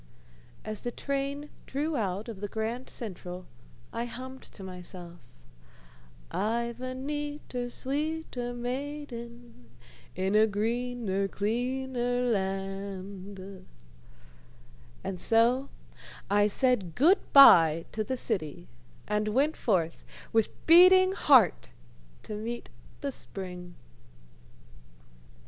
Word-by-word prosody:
As 215 -1 -4
the 245 - -2
train 280 +3 -3 0.2
drew 295 +3 -1
out 205 -3 -2
of 215 -4 -7
the 205 - -2
Grand 225 +5 -3
Central, 180 -4 -6 0.5
I 230 +1 -2
hummed 260 +2 -8
to 195 - -10
myself, 180 -1 -8 1.1
"I've 235 +3 -1
a 255 0 -4
neater, 290 -2 -4
sweeter 280 -2 -3
maiden, 245 - -6 0.5
in 190 +2 0
a 215 +1 +6
greener, 220 -2 -1
cleaner 245 +4 -1
land" 195 -2 -4 1.4
and 190 -1 -4
so 240 +6 +3 0.6
I 205 0 +5
said 210 - +1
good 345 +9 +5
by 165 - +8
to 215 - -2
the 260 +5 -3
city, 155 - -3 0.4
and 210 0 0
went 275 +8 +2
forth 170 -7 0 0.3
with 225 -1 +3 0.2
beating 370 +3 +8
heart 260 - +4 0.5
to - - -6
meet 230 +3 -5 0.3
the 280 - -2
spring. 180 -6 -7
230 Hz, 100 wpm, -29 LUFS, 195-260 Hz, 1.4 s, by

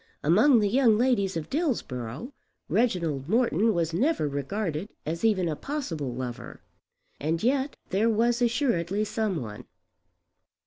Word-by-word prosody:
Among 220 - +5
the 205 - +2
young 230 0 +4
ladies 215 -7 +1
of 155 -1 -5
Dillsborough 165 - -3 0.3
Reginald 170 - 0
Morton 225 -2 +3
was 165 -4 -1
never 255 - +1
regarded 155 +5 -3 0.2
as 165 +5 -4
even 200 -6 +2
a 155 - -1
possible 165 - -4
lover. 120 -1 -7 0.6
And 160 +5 -1
yet 270 +3 +1
there 205 +4 +2
was 235 +2 +2
assuredly 215 - +1
some 215 -5 -1
one. 105 -5 -8
200 Hz, 130 wpm, -27 LUFS, 155-240 Hz, 0.6 s, Among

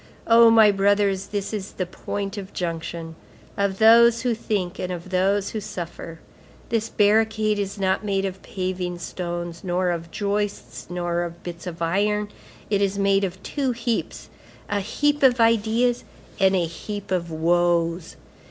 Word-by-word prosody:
Oh 230 0 +7
my 220 -2 +7
brothers, 200 -1 +2
this 205 0 -4
is 205 -2 -5
the 185 - -2
point 195 +3 -5
of 195 -2 -8
junction, 165 -1 -4 0.4
of 200 -1 0
those 230 +2 +6
who 245 -2 +1
think 200 -5 -3
and 180 - -3
of 180 +1 -7
those 195 +2 +1
who 220 - -3
suffer; 170 -4 -7 0.5
this 225 -1 -1
barricade 215 0 +2
is 200 0 -3
not 190 +1 0
made 195 -2 0
of 190 0 -5
paving 185 -2 -3
stones, 175 -1 -5
nor 180 0 0
of 170 -1 -4
joists, 200 - -3
nor 175 -1 -1
of 170 0 -6
bits 175 +1 -7
of 170 -1 -5
iron; 205 +4 0 0.4
it 200 -1 +1
is 200 0 0
made 195 0 +2
of 190 0 -4
two 270 -4 -1
heaps, 235 -1 -3 0.4
a 205 - +1
heap 290 +9 0
of 255 -2 +5
ideas, 230 +2 +2 0.4
and 190 0 +4
a 175 -2 +2
heap 205 +5 -7
of 175 -2 -1
woes. 170 +1 +1
195 Hz, 160 wpm, -23 LUFS, 175-210 Hz, 0.5 s, Oh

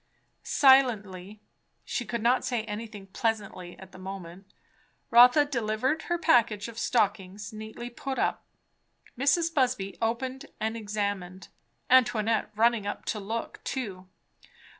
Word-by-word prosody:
Silently, 215 -7 +3 0.4
she 245 - -3
could 230 +1 -4
not 245 +2 +3
say 240 -3 -1
anything 210 -2 -7
"pleasantly" 200 -3 -3
at 190 0 -13
the - - -13
moment, 190 0 -9 0.6
Rotha 245 +5 +7
delivered 255 +3 -1
her 345 - -1
package 230 -9 +3
of 230 -1 -8
stockings 205 -2 -1
neatly 220 +3 -8
put 265 +2 -5
up. - - 0 0.7
Mrs. 325 +6 +2
Busby 250 - 0
opened 260 +5 -2
and 220 +1 -2
examined, 200 -4 -4 0.4
Antoinette 225 -4 +3
running 225 -1 +2
up 205 - -5
to 215 - -2
look 220 +3 -5
too. 195 -8 -5
220 Hz, 120 wpm, -28 LUFS, 200-245 Hz, 0.7 s, Rotha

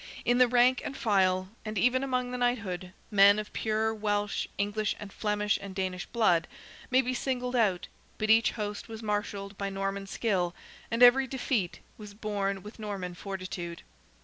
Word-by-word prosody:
In 245 +1 +3
the 250 - +7
rank 250 +2 +4
and 270 - -5
file, 185 -4 +2
and 215 -1 -4
even 250 +5 +3
among 250 -2 -1
the 250 - -3
knighthood, 205 -7 -1 0.2
men 200 0 +7
of 215 0 -5
pure 220 0 0
Welsh, 205 -1 -1
English, 205 +1 0
and 205 -2 -9
Flemish 210 -1 0
and 195 -1 -8
Danish 185 -2 -3
blood, 180 -8 +2 0.4
may 260 +1 +4
be 255 +1 -1
singled 250 0 -2
out, 205 -7 +2 0.3
but 215 0 +1
each 225 +1 +5
host 210 -2 -4
was 225 0 -8
marshalled 205 -1 -3
by 200 0 -1
Norman 195 0 -3
skill, 190 -5 0 0.3
and 230 +2 +3
every 260 +2 +7
defeat 240 -7 -2 0.2
was 210 -1 -10
borne 200 -3 -2
with 210 +2 -11
Norman 200 -4 -4
fortitude. 185 -2 -6
210 Hz, 170 wpm, -29 LUFS, 195-240 Hz, 0.4 s, the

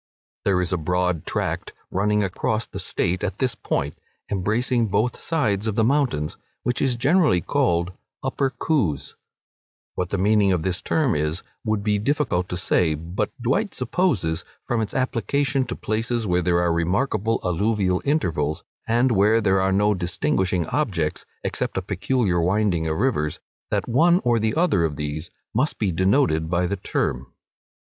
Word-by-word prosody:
There 95 -2 +3
is 90 0 -1
a 90 - 0
broad 90 0 0
tract - - -2 0.2
running 105 +2 +2
across 105 +3 -1
the - - -7
State 90 +1 -1
at 100 -1 -2
this 130 -2 0
point, 70 - -3 0.3
embracing 115 +5 +1
both 105 +5 +1
sides 110 - 0
of 110 - -1
the 110 - +3
mountains, 120 - +1 0.3
which 125 - -1
is 130 -3 +2
generally 140 - +3
called 85 +1 0 0.3
Upper 135 +1 0
Coos. 120 - -1 0.8
What 90 -1 -2
the 100 - -1
meaning 100 +1 +3
of 90 -4 0
this 90 0 -1
term 150 -8 +1
is, 75 +4 -1 0.2
would 110 -2 -1
be 105 -1 +1
difficult 120 - 0
to 90 - -3
say; 85 -2 +2
but 85 +7 -3
Dwight 195 - 0
supposes, 120 - 0 0.2
from 120 -2 0
its 110 - -4
application 130 +1 0
to 120 - -4
places 115 +1 -1
where 90 -2 +2
there 85 0 +2
are 85 -1 +2
remarkable 105 +6 0
alluvial 95 +1 +1
intervals, 80 - 0 0.2
and 120 +3 +3
where 105 +2 +4
there 95 -3 +2
are 95 0 +2
no 105 +2 +3
distinguishing 90 -1 0
objects, 90 - -1 0.2
except - - -2
a - - +1
peculiar 100 -1 0
winding 90 -2 +1
of 80 0 -1
rivers, 85 - 0 0.3
that - - -1
one 170 +9 +4
or 120 -2 +3
the 110 0 0
other 165 - +3
of 80 -3 -1
these 75 +3 -4 0.2
must - - +1
be 100 -3 0
denoted 95 - +2
by 90 +1 +1
the 100 +3 -1
term. 65 -7 -2
100 Hz, 165 wpm, -23 LUFS, 90-120 Hz, 0.8 s, where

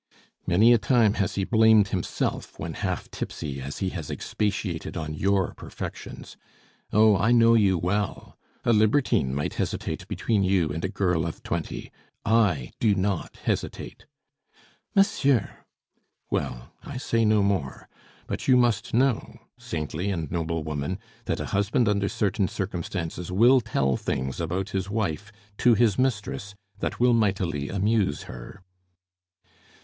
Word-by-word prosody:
Many 105 +7 +6
a 120 - +4
time 115 -4 +3
has 95 - -1
he 100 - 0
blamed 110 -1 +5
himself 90 -2 -3
when - - -5
half - - -3
tipsy 70 -3 -5
as 70 +2 -6
he 95 - -1
has 85 -5 -6
expatiated 95 -6 -3
on 80 -1 -4
your 95 +3 +1
perfections. - - -8 0.5
Oh, 110 0 +5
I 110 +4 +2
know 115 -1 +6
you 100 -5 +4
well! 95 +4 -2 0.3
A 120 - +4
libertine 110 - +3
might 75 - -2
hesitate - - -3
between 105 -4 0
you 95 -4 +2
and 80 +3 -4
a 95 - 0
girl 90 -5 0
of 85 -2 -5
twenty. - - -4 0.3
I 100 - +2
do 105 -3 +3
not 95 -2 -2
hesitate - - -3 0.4
" - - -32
"Monsieur!" 140 - +2 0.7
"Well, - - -3
I 140 - -7
say 115 -3 0
no 105 -2 +4
more. 95 -10 -1 0.4
But - - -5
you 130 -2 +6
must 120 -3 +1
know, 130 -1 +1 0.2
saintly 80 +4 -3
and 80 -6 -3
noble 80 -1 -2
woman, 75 +4 -3 0.3
that - - -1
a - - -3
husband 105 +5 +2
under 100 -1 +1
certain 100 -1 0
circumstances 90 -2 -4
will 120 +7 +5
tell 65 - 0
things 65 +3 -3
about 95 +5 -2
his 95 0 -2
wife 105 -1 -2 0.3
to 120 -2 +5
his 110 -2 +2
mistress 105 -5 -1 0.2
that - - -3
will 125 0 +4
mightily 95 -10 0
amuse 100 -4 +1
her." 65 +10 -10
100 Hz, 145 wpm, -26 LUFS, 85-110 Hz, 0.7 s, Many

